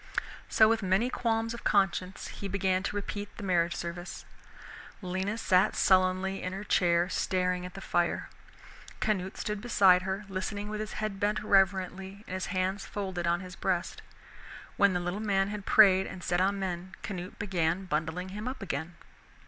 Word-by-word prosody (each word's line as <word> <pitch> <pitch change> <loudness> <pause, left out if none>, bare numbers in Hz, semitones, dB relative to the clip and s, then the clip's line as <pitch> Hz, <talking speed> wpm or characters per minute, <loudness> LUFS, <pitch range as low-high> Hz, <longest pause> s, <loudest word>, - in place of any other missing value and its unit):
So 220 - +6
with 225 0 +2
many 195 +6 +1
qualms 225 -1 0
of 235 - -8
conscience 190 -2 +1
he 200 - -6
began 190 -1 +1
to 195 - -3
repeat 205 0 -5
the 210 - -7
marriage 175 -3 +1
service. 175 +1 -6 0.8
Lena 190 +4 -2
sat 185 -4 +3
sullenly 185 +1 +3
in 185 - -4
her 195 +2 -5
chair, 175 -3 +3
staring 180 -1 0
at 180 - -14
the 195 - -7
fire. 175 -1 0 0.7
Canute 190 -2 -1
stood 210 -1 -3
beside 195 -6 +5
her, 190 +2 -3
listening 205 +2 -4
with 215 0 -4
his 215 -1 -4
head 215 -2 -3
bent 210 +1 0
reverently 190 0 +1
and - - -8
his 185 - -3
hands 190 +1 -1
folded 190 -4 -4
on 170 +2 +1
his 180 -1 -9
breast. 180 -1 -2 0.7
When 200 -1 +4
the 180 - 0
little 175 +3 -3
man 195 -2 +1
had 205 -1 -6
prayed 190 -3 +6
and 185 -2 -8
said 175 +1 +1
amen, 190 -1 -1
Canute 185 -1 -6
began 180 -2 0
bundling 165 +3 -2
him 210 +4 -6
up 255 -4 -5
again. 165 -1 -4
190 Hz, 170 wpm, -29 LUFS, 180-205 Hz, 0.8 s, So